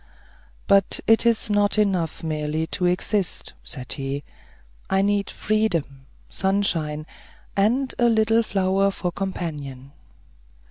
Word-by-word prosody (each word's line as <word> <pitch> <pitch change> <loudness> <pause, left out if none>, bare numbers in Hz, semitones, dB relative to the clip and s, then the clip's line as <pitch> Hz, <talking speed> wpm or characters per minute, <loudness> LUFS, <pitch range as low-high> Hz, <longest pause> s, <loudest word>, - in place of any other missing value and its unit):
"But 200 -1 +4
it 225 +1 +5
is 230 -2 +3
not 205 0 +2
enough 185 -8 0
merely 155 0 -2
to 180 +2 0
exist," 185 +2 -1
said 130 -3 -5
he, 140 0 -4 0.7
"I 190 0 +2
need 205 0 +1
freedom, 165 -11 -1 0.2
sunshine, 165 -6 0 0.5
and 245 +7 +2
a 240 -1 +4
little 225 0 +3
flower 195 -2 +1
for 190 -2 -3
a - - -6
companion." 150 -8 -5
190 Hz, 120 wpm, -23 LUFS, 155-205 Hz, 0.7 s, it